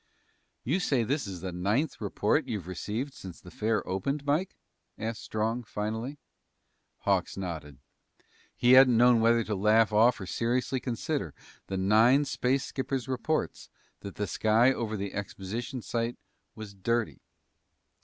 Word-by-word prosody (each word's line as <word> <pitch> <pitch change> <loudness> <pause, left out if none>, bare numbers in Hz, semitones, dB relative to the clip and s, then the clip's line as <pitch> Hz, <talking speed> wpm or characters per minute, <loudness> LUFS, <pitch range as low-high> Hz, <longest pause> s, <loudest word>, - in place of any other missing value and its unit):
"You 155 +10 0
say 135 -9 +1
this 135 +2 -1
is 90 -3 -7
the 95 0 -4
ninth 105 - -1
report - - 0
you've 100 -6 -4
received 105 +9 -4
since 95 - -10
the 90 - -13
fair 110 -1 -1
opened, 140 +11 -2
Mike?" 155 +6 0 0.4
asked 110 +1 -4
Strong 115 +3 -2
finally. 110 +7 -4 0.8
Hawks - - 0
nodded. 80 -7 -6 0.8
He 120 - +3
hadn't 130 -2 +8
known 120 -1 +5
whether 115 0 +4
to 105 - -3
laugh 105 +2 +3
off 115 +4 +4
or 95 - -6
seriously 125 +6 -1
consider 120 -3 -3 0.3
the 95 - -3
nine 110 +9 +4
space 130 0 0
skippers' 135 -2 -3
reports 130 +5 -2 0.3
that 100 - -8
the 105 - -2
sky 110 +6 +3
over 110 -4 -3
the 100 0 -4
exposition 105 +5 -5
site 115 0 -2 0.4
was 110 -2 -8
dirty. 115 +4 -1
115 Hz, 145 wpm, -29 LUFS, 100-130 Hz, 0.8 s, hadn't